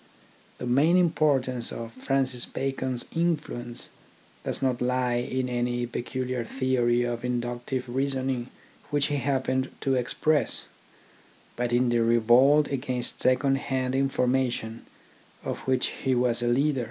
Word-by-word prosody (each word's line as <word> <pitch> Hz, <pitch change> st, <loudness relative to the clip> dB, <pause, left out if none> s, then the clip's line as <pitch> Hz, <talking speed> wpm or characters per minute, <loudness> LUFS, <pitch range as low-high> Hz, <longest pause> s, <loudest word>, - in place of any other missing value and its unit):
The -, -, -5 dB
main 145 Hz, +8 st, +4 dB
importance 140 Hz, -8 st, +2 dB
of 115 Hz, -1 st, -6 dB
Francis 130 Hz, 0 st, -1 dB
Bacon's 130 Hz, -2 st, -3 dB
influence 145 Hz, -8 st, -2 dB, 0.5 s
does -, -, -1 dB
not 130 Hz, -2 st, 0 dB
lie 125 Hz, 0 st, +1 dB
in 130 Hz, +1 st, -1 dB
any 120 Hz, 0 st, -1 dB
peculiar 125 Hz, +1 st, -3 dB
theory 120 Hz, -1 st, +1 dB
of 120 Hz, -1 st, -3 dB
inductive 120 Hz, +1 st, -2 dB
reasoning 130 Hz, -1 st, -1 dB, 0.4 s
which 145 Hz, 0 st, +1 dB
he 145 Hz, -, 0 dB
happened 130 Hz, 0 st, 0 dB
to 135 Hz, -1 st, +1 dB
ex 125 Hz, -1 st, -2 dB
press, 155 Hz, -1 st, +1 dB, 0.9 s
but 120 Hz, 0 st, -1 dB
in 120 Hz, +1 st, +3 dB
the 120 Hz, 0 st, +2 dB
revolt 120 Hz, +6 st, +5 dB
against 130 Hz, -3 st, -3 dB
second 135 Hz, +2 st, +3 dB
hand 130 Hz, -2 st, -2 dB
information 125 Hz, -4 st, 0 dB, 0.6 s
of -, -, -3 dB
which 130 Hz, -1 st, +2 dB
he 130 Hz, -1 st, +2 dB
was 120 Hz, -1 st, +2 dB
a 120 Hz, -, 0 dB
leader. 135 Hz, +3 st, +2 dB
130 Hz, 130 wpm, -27 LUFS, 120-135 Hz, 0.9 s, revolt